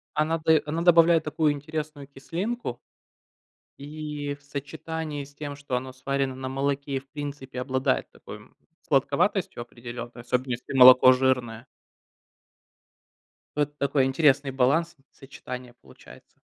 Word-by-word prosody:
Она 155 +2 +1
дае 160 -1 +3
она 160 +3 -2
добавляет 170 -1 +5
такую 150 0 +1
интересную 150 0 -6
кислинку 165 - -5 1.0
и 150 0 -5
в 140 - -19
сочетании 145 +1 -5
с 145 +1 -18
тем, 145 -1 -6
что 140 -3 -3
оно 130 +1 -5
сварено 135 +1 -2
на 130 0 -5
молоке 140 +1 -2
и, - - +2
в 135 +1 -16
принципе, 140 -3 -6
обладает 130 0 -1
такой, - - -11
м, - - -20 0.3
сладковатостью - - +1
определенной, 120 0 -9
особенно, 125 +1 -1
если 120 - -6
молоко 130 0 +9
жирное. 125 -3 0 1.9
Вот 145 0 -1
такой 140 -1 +1
интересный 140 0 +3
баланс 140 +6 +1
и - - -28
сочетание 125 -2 -9
получается. 65 - -18
140 Hz, 130 wpm, -26 LUFS, 130-150 Hz, 1.9 s, молоко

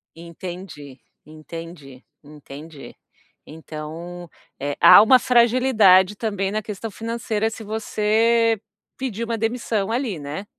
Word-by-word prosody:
Entendi, 170 -4 -10 0.3
entendi, 155 -3 -11 0.2
entendi. 145 0 -12 0.5
Então, 160 +3 -9 0.3
eh, 145 0 -3
há - - +9
uma 255 +4 +6
fragilidade, 230 -6 +4
também, 200 -3 -3
na 215 +1 -2
questão 210 +1 -7
financeira 225 0 -3
se 225 0 -9
você, 220 +1 +1 0.4
pedir 235 -4 -4
uma 230 0 -3
demissão, 225 -2 -2
ali, 235 - -2
né? 145 +8 -7
200 Hz, 110 wpm, -22 LUFS, 160-225 Hz, 0.5 s, há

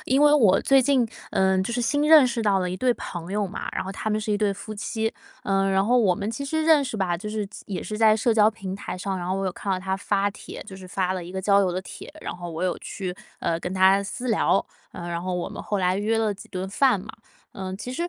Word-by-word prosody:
因 270 +3 +3
为 295 0 +6
我 215 -10 +5
最 270 -1 +5
近， 260 -2 +3 0.3
嗯， 190 0 +3
就 235 - -3
是 245 - 0
新 290 +4 +1
认 305 -5 +8
识 235 -1 -2
到 200 -2 +3
的 180 -1 -1
一 - - -3
对 250 +6 +2
朋 175 +1 -7
友 205 0 0
嘛， 190 - -6
然 - - -2
后 190 - -5
他 215 - -4
们 215 - +1
是 215 0 -2
一 205 - +1
对 210 -1 +2
夫 215 +2 -8
妻， 220 +2 -2 0.3
呃， 195 -3 +1
然 195 0 +2
后 245 +4 +4
我 200 -6 +3
们 210 +2 -3
其 235 +5 -5
实 315 +3 -1
认 315 -2 +5
识 250 -5 -4
吧， 185 -3 0
就 210 +4 -6
是 210 -1 -2 0.2
也 190 -3 -4
是 215 - -5
在 220 -1 +5
社 225 +2 +2
交 215 -1 +5
平 195 -4 -6
台 195 - -6
上， 190 +1 -3
然 175 0 -4
后 185 - 0
我 195 - -2
有 185 - -1
看 200 - -5
到 185 - +1
他 190 0 -2
发 200 +1 0
帖， - - -9
就 190 - -9
是 190 -1 -11
发 185 0 0
了 185 -1 -4
一 170 - -9
个 190 - -4
交 200 +1 +4
友 190 - +2
的 185 +1 -3
帖， - - -10
然 - - -4
后 175 -1 -7
我 165 +1 -5
有 180 - -1
去， 185 -3 -5 0.3
呃， 165 0 -1
跟 180 - -4
他 190 +1 +5
私 240 +5 -5
聊， 205 -3 +2 0.3
呃， 175 - -7
然 170 0 -3
后 185 0 -2
我 180 - -3
们 - - -7
后 205 - -2
来 185 0 +1
约 215 +2 +1
了 220 -2 +1
几 200 - -12
顿 185 0 -4
饭 235 +3 +3
嘛。 205 +4 -9 0.4
呃， 190 -1 -5
其 230 +5 -6
实 340 +6 -2
200 Hz, 305 characters per minute, -25 LUFS, 185-225 Hz, 0.4 s, 认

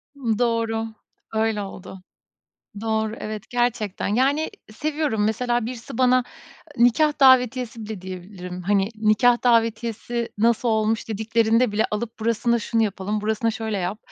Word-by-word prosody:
Imm, 230 -6 -1
doğru, 230 -2 0 0.5
öyle 220 -1 0
oldu. 190 -1 -9 0.8
Doğru, 220 0 -1
evet, 215 -1 -5
gerçekten, 240 -5 -1
yani, 270 +8 +1 0.2
seviyorum, 295 -4 -1
mesela, 240 +1 0
birisi 240 +1 -7
bana 255 0 +4 0.5
nikâh 290 +6 +3
davetiyesi 250 -3 +4
bile 215 -2 -6
diyebilirim. 180 -1 -8
Hani, 200 +1 +2
nikâh 220 +3 +3
davetiyesi, 230 0 +1
"Nasıl 235 +2 +2
olmuş?" 220 0 0
dediklerinde 225 +1 +2
bile 215 - +1
alıp 220 +2 -4
burasına 230 +1 +1
şunu 225 +1 0
yapalım, 205 0 -2
burasına 220 +2 0
şöyle 220 -2 -3
yap, 190 +4 -3
225 Hz, 130 wpm, -23 LUFS, 215-240 Hz, 0.8 s, bana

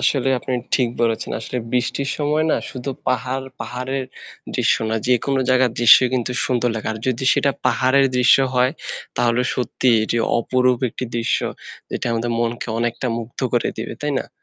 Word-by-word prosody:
আসলে 135 -2 +1
আপনি 130 - -5 0.2
ঠিক 125 -3 +2
বলেছেন। 115 -1 0
আসলে 120 +2 -4
বৃষ্টির 125 +3 0
সময় 150 +1 +1
না - - +3
শুধু 130 +1 -5 0.2
পাহাড় 130 +1 -1 0.2
পাহাড়ের 130 +3 -3 0.5
দৃশ্য - - +3
না 110 - 0
যেকোনো 130 +2 +2
জায়গার 130 -1 +4
দৃশ্যই 120 +2 +7
কিন্তু 125 0 -1
সুন্দর 125 -1 +1
লাগে। 110 - -3
আর 110 - -6
যদি 130 +1 -1
সেটা 140 - +2 0.2
পাহাড়ের 130 +2 +3
দৃশ্য 125 - +6 0.2
হয় 125 +1 +3 0.5
তাহলে 120 0 +2
সত্যিই 125 -1 +1
এটি 115 - -1 0.2
অপরূপ 125 +1 +2
একটি 130 - -5
দৃশ্য 115 - +1 0.5
যেটা - - -3
আমাদের 115 +1 -1
মনকে 120 +1 -2
অনেকটা 120 +2 -1
মুগ্ধ 115 0 -8
করে 120 - +1
দিবে। 110 - -5
তাই 150 -1 -1
না? - - -6
125 Hz, 165 wpm, -21 LUFS, 120-130 Hz, 0.5 s, দৃশ্যই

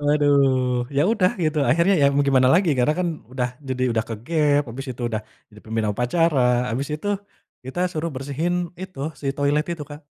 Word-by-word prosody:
Waduh. 135 -4 +2
Ya 140 - +4
udah 185 -5 +3
gitu, 155 0 0
akhirnya 170 +5 +4
ya - - +7
mau 140 0 +3
gimana 130 -2 +4
lagi, 180 -1 +3
karena 125 +5 +3
kan 180 - 0 0.2
udah 125 -2 -1 0.2
jadi 130 -1 -2
udah 110 -1 0
ke-gap, 145 +6 +1
abis 135 +4 -7
itu 125 - -9
udah 110 -1 -2 0.3
jadi 105 - -14
pemimpin 110 -1 -2
upacara, 150 - +1 0.3
abis 135 +5 -2
itu 205 - -5 0.6
kita 130 +8 -5
suruh 160 0 -2
bersihin 145 +6 -2 0.3
itu, 185 -6 -9 0.2
si 140 - -5
toilet 145 +2 +1
itu, 160 -3 -6
Kak. 145 +1 -9
145 Hz, 185 wpm, -23 LUFS, 125-155 Hz, 0.6 s, ya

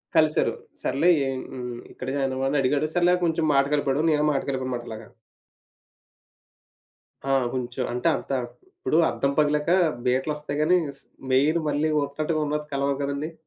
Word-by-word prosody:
కలిసారు. 155 -1 +3 0.3
సర్లే 160 +6 +2 0.2
ఎ - - -1 0.2
హ్మ్. 125 -1 -6
ఇక్కడ 130 - -8
జాయిన్ 135 -1 0
అయ్యావు 135 +1 -1
అని 145 0 +1
అడిగాడు. 145 +3 +1
సర్లే 175 0 +4
కొంచెం 165 -1 +1
మాట 140 0 +4
కలిపాడు. 140 0 0
నేనే 150 0 +2
మాట 135 - 0
కలిపానుమాట 130 -2 -3
అలాగా. 110 -1 -8 2.2
ఆ! 135 - -1 0.2
కొంచెం. 125 0 -3
అంటే 125 - -1
అంత - - -8 0.4
ఇప్పుడు 360 - -1
అద్దం 140 - 0
పగిలాక 150 +1 +2 0.4
బీట్ల 130 +4 +1
వస్తాయి 150 -1 -5
కానీ 180 +4 +4 0.2
స్ - - -12 0.3
మెయిన్ 150 +6 +3
మళ్ళీ 150 +2 +1 0.2
ఒక్కటిగున్నట్టు 150 0 -2
కలవవు 140 0 0
కదండీ! 140 +3 -3
145 Hz, 145 wpm, -25 LUFS, 135-155 Hz, 2.2 s, సర్లే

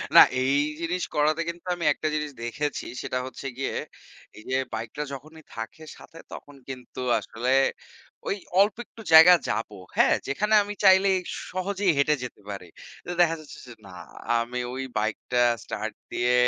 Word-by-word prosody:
না - - +12 0.2
এই 130 +1 +2 0.3
জিনিস 180 +2 -1
করাতে 155 +2 +2
কিন্তু 170 +1 -8
আমি 170 -2 -4
একটা 155 - -3
জিনিস 150 -1 -2
দেখেছি 145 +5 -3 0.2
সেটা 130 - -3
হচ্ছে 130 +1 -9
গিয়ে, 135 - -2 0.6
এইযে 130 +5 -4 0.2
বাইকটা 115 +6 -5
যখনই 155 +4 -10
থাকে 115 +7 -7
সাথে 165 - -15
তখন 145 -1 -10
কিন্তু 125 -2 -8 0.2
আসলে 115 +4 -4 0.8
ওই 195 - 0 0.2
অল্প 200 +1 +4
একটু 225 - -14
জায়গায় 170 +2 +10
যাবো। 110 -2 -2 0.2
হ্যাঁ? - - +5
যেখানে 210 +11 0
আমি 205 +1 -6
চাইলেই 190 0 +6 0.3
সহজেই 190 +1 0
হেঁটে 145 +2 +3
যেতে 125 -4 -8
পারি। 100 -3 -6 0.4
তো - - -8
দেখা 165 -1 +4
যাচ্ছে 155 - -12
যে - - -10
না - - -12 0.5
আমি 120 +2 -3
ওই 135 +1 -4
বাইকটা 110 +3 -2 0.3
start 110 +1 -4 0.2
দিয়ে, 120 +1 +1
150 Hz, 155 wpm, -26 LUFS, 125-175 Hz, 0.8 s, না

